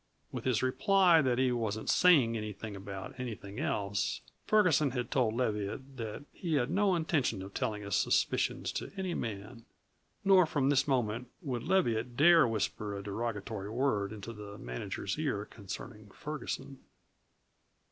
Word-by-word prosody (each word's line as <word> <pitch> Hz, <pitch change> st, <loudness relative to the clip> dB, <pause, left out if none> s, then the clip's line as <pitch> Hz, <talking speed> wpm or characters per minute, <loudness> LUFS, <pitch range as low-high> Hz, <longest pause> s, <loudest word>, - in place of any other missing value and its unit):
With -, -, -6 dB
his 125 Hz, -4 st, +1 dB
reply 165 Hz, +6 st, +4 dB
that 125 Hz, -3 st, +1 dB
he 130 Hz, -1 st, +3 dB
wasn't 110 Hz, -3 st, -2 dB
"sayin' 140 Hz, -11 st, +5 dB
anything 105 Hz, -1 st, -5 dB
about 95 Hz, 0 st, -7 dB
anything 105 Hz, -5 st, -6 dB
else," 100 Hz, 0 st, -1 dB, 0.3 s
Ferguson 180 Hz, -9 st, +4 dB
had 125 Hz, -2 st, -3 dB
told 115 Hz, -5 st, +2 dB
Leviatt 120 Hz, +3 st, -2 dB
that 115 Hz, +3 st, -5 dB
he 165 Hz, -4 st, -2 dB
had 135 Hz, 0 st, +1 dB
no 195 Hz, 0 st, +3 dB
intention 145 Hz, -, 0 dB
of 100 Hz, +1 st, -10 dB
telling 105 Hz, -1 st, -2 dB
his 100 Hz, -1 st, -1 dB
suspicions -, -, +1 dB
to -, -, -5 dB
any 190 Hz, -2 st, -2 dB
man. 115 Hz, 0 st, -5 dB, 0.6 s
Nor 190 Hz, -3 st, +6 dB
from 140 Hz, -3 st, +1 dB
this 140 Hz, 0 st, +3 dB
moment 125 Hz, -2 st, 0 dB, 0.2 s
would 125 Hz, -6 st, -2 dB
Leviatt 120 Hz, -10 st, +1 dB
dare 165 Hz, -1 st, +7 dB
whisper 105 Hz, -1 st, -2 dB
a 100 Hz, -, -6 dB
derogatory 105 Hz, -1 st, -4 dB
word 110 Hz, -4 st, 0 dB
into 110 Hz, +2 st, -7 dB
the 105 Hz, -1 st, -9 dB
manager's 95 Hz, -, -4 dB
ear 130 Hz, -10 st, -1 dB
concerning 105 Hz, +1 st, -9 dB
Ferguson. 140 Hz, +1 st, -6 dB
120 Hz, 145 wpm, -32 LUFS, 105-140 Hz, 0.6 s, dare